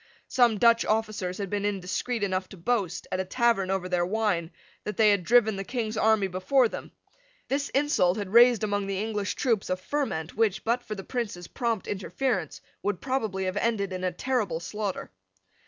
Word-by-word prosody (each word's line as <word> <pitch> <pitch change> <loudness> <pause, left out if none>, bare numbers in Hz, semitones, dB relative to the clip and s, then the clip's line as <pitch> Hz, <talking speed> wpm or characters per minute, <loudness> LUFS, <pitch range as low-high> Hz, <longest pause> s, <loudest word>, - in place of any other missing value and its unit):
Some 240 -4 +3
Dutch 230 +2 +5
officers 215 -4 -1
had 200 -2 -4
been 205 -1 -1
indiscreet 205 +4 -2
enough 185 -1 -1
to 195 - -11
boast, 185 -1 -1
at 185 - -1
a - - +1
tavern 210 -1 +1
over 190 -1 -1
their 180 -1 +1
wine, 190 -4 0 0.3
that 210 - -5
they 215 -2 +6
had 200 -3 +1
driven 220 +1 +4
the 195 - -3
King's 230 -1 -3
army 220 -2 +3
before 190 +8 +2
them. - - -8 0.6
This 280 +1 0
insult 260 -10 +2
had 200 -1 -5
raised 240 -1 +7
among 205 -1 -1
the 195 -1 -2
English 210 -1 -2
troops 230 -6 0
a 185 - 0
ferment 185 - -3
which, 215 -4 +1
but 235 +2 +1
for 215 -3 -6
the 195 - -7
Prince's 205 -8 -4
prompt 230 -5 -2
interference, 200 - -2 0.2
would 205 -3 -1
probably 220 -8 -2
have 185 +2 -2
ended 205 -4 0
in 185 0 -4
a 185 - +1
terrible 210 -5 -1
slaughter. 200 +2 -4
205 Hz, 190 wpm, -27 LUFS, 185-235 Hz, 0.6 s, raised